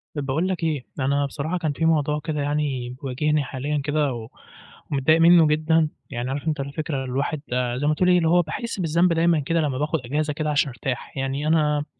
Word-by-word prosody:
طب 145 -2 -3
باقول 155 +7 0
لك 185 -3 -3
إيه، 150 -5 -1
أنا 140 +2 +1
بصراحة 155 +5 -3
كان 160 -4 -1
في 160 - -1
موضوع 150 -2 +2
كده 150 -2 -2
يعني 140 -4 -1
بيواجهني 145 +3 0
حاليًا 140 +2 -3
كده، 145 -2 0
و 115 -2 -7 0.6
ومتضايق 150 +4 +3
منه 170 -1 +7
جدًا، 155 +1 +2 0.2
يعني 120 +2 -4
عارف 140 +3 -4
أنت 155 -2 0
الفكرة 140 0 -3
الواحد 140 +4 -2 0.4
زَي 145 +3 -1
ما 155 - +3
تقول 180 +4 +2
إيه، 180 - +5
اللي 165 -2 +2
هو 175 +1 +5
باحِس 195 +7 -5
بالذنب 170 +1 +2
دايمًا 165 0 +3
كده، 165 +4 0
لمّا 140 -4 -1
باخد 150 +3 0
أجازة 150 +4 -1
كده 155 +1 -2
عشان 145 -1 +2
أرتاح، 125 +1 -5
يعني 135 +2 -2
أنا 150 -2 +2
150 Hz, 205 wpm, -23 LUFS, 140-160 Hz, 0.6 s, منه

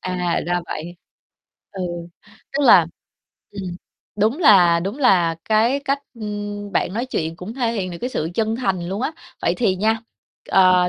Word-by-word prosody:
À, 180 -2 -1
ra 175 0 0
vậy. 170 +3 -6 0.7
Ừ, 190 -2 -5 0.7
tức 285 +1 0
là - - +8 0.6
ừm, 185 -3 -6 0.4
đúng 220 +7 +1
là 180 - +6
đúng 195 +9 -4
là 180 - +3
cái 230 +6 +2
cách, 275 +1 +1 0.2
ưm, 205 -2 -5
bạn 185 - 0
nói 235 +4 -2
chuyện 165 -10 -3
cũng 185 +6 -8
thể 240 -3 0
hiện 195 -5 -2
được 170 - -7
cái 250 - -3
sự 160 -7 -2
chân 220 +1 0
thành 190 -8 -1
luôn 195 +5 -3
á. 305 - -1 0.3
Vậy 170 - +2
thì 195 -6 +1
nha, 220 +3 +1 0.5
ờ, 185 -1 +5
200 Hz, 170 wpm, -21 LUFS, 180-225 Hz, 0.7 s, là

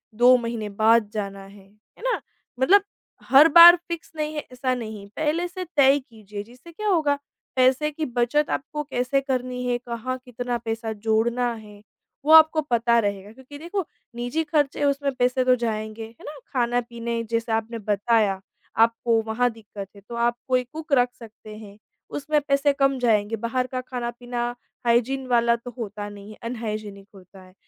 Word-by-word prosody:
2 245 +3 +6
महीने 230 -3 -4
बाद 220 +1 +3
जाना 200 -2 -5
है। 195 0 -16
है 210 - -22
ना? - - 0 0.4
मतलब 390 +10 +5 0.5
हर 275 +5 +8
बार 345 +1 +12
फिक्स 340 -1 -6
नहीं 305 0 -3
है - - -1
ऐसा 255 0 -1
नहीं, 215 -4 -7
पहले 315 +3 0
से 370 +1 -6
तय 280 0 +6
कीजिए। 210 -6 -10
जिससे 250 +9 -16
क्या 425 +5 -5
होगा 305 -6 +2 0.4
पैसे 260 +4 +3
की 310 +1 -3
बचत 245 +5 0
आपको 300 +1 -3
कैसे 275 0 -1
करनी 255 -2 -3
है, 245 - +1
कहाँ 245 +1 -5
कितना 245 0 -3
पैसा 225 -1 -4
जोड़ना 225 +3 0
है 210 -2 -12 0.4
वो 310 - +3
आपको 315 0 +7
पता 235 -4 +2
रहेगा, 200 -1 -3
क्योंकि 265 +3 -12
देखो 345 +3 -3 0.3
निजी 245 +7 -2
खर्चे 295 -2 0
हैं 290 - +1
उसमें 280 0 +1
पैसे 250 0 +1
तो 255 0 +5
जाएँगे। 220 -1 -4
है 230 - -18
ना? 295 0 -8 0.2
खाना-पीने 235 -2 -1
जैसे 230 0 -1
आपने 225 +1 -2
बताया, 205 -1 +1 0.4
आपको 230 0 +3
वहाँ 225 +3 0
दिक्कत 205 -3 -10
है। 200 - -14
तो 235 - -6
आप 235 0 +1
कोई 255 -1 +2
कुक 315 -2 -5
रख 245 -2 +4
सकते 220 -1 -12
हैं, 205 -2 -12 0.3
उसमें 300 +1 0
पैसे 280 +1 +3
कम 275 -1 +2
जाएँगे। 220 -2 +2
बाहर 235 +3 -2
का 255 0 -4
खाना-पीना 245 -1 -4 0.4
हाइजीन 250 +3 +1
वाला 235 -1 +3
तो 240 +1 -9
होता 205 -2 -5
नहीं 205 0 -11
है, - - -13
अनहाइजीनिक 215 -4 -5
होता 190 0 -15
है। 185 - -18
240 Hz, 175 wpm, -24 LUFS, 220-275 Hz, 0.5 s, बार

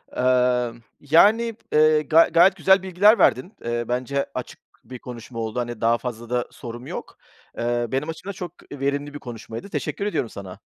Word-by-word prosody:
Eee, 125 -1 +2 0.3
yani, 210 +10 +4 0.2
eee, 155 0 +5
ga 160 +2 +5
gayet 175 +3 +6
güzel 190 0 +4
bilgiler 195 +4 +4
verdin. 150 - +2
Eee, 120 0 -1
bence 130 +3 -1
açık 125 - -6 0.2
bir 125 -2 -10
konuşma 120 -1 -9
oldu, 110 +1 -3
hani 120 -2 -4
daha 115 +1 +3
fazla 120 -2 -7
da 125 0 -1
sorum 120 +1 -9
yok. - - -7 0.4
Eee, 120 0 -1
benim 135 +4 -1
açımdan 180 +5 -6
çok 180 -3 -7 0.2
verimli 140 +1 -2
bir 145 - -7
konuşmaydı, 115 - -8
teşekkür 200 - -3
ediyorum 205 - -1
sana. 95 -3 -9
130 Hz, 170 wpm, -23 LUFS, 120-165 Hz, 0.4 s, gayet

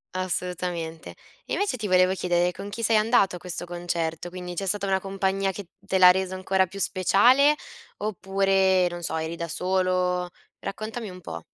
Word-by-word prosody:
Assolutamente. 180 -3 -4 0.3
Invece 405 -9 -1
ti 220 -4 -4
volevo 185 0 +4
chiedere 175 -1 +1
con 200 +3 -8
chi 230 +3 -6
sei 225 0 +4
andato 215 -3 +3
a - - -7
questo 175 -1 -5
concerto? 175 -1 -3
Quindi, 180 0 -7
c'è 195 +3 -3
stata 200 +1 -1
una 190 -1 +1
compagnia 195 0 -1
che 190 -2 -9
te 195 0 -1
l'ha 180 -1 +9
reso 190 0 -1
ancora 190 0 +1
più 195 +3 -9
speciale? 245 +11 +4 0.4
Oppure, 195 -2 +2
non 175 0 -7
so, 160 -1 -2
eri 160 +1 -3
da 170 0 -4
solo? 180 0 0 0.3
Raccontami 220 +2 -5
un 185 0 -10
po'. 85 - -8
185 Hz, 170 wpm, -25 LUFS, 180-195 Hz, 0.4 s, l'ha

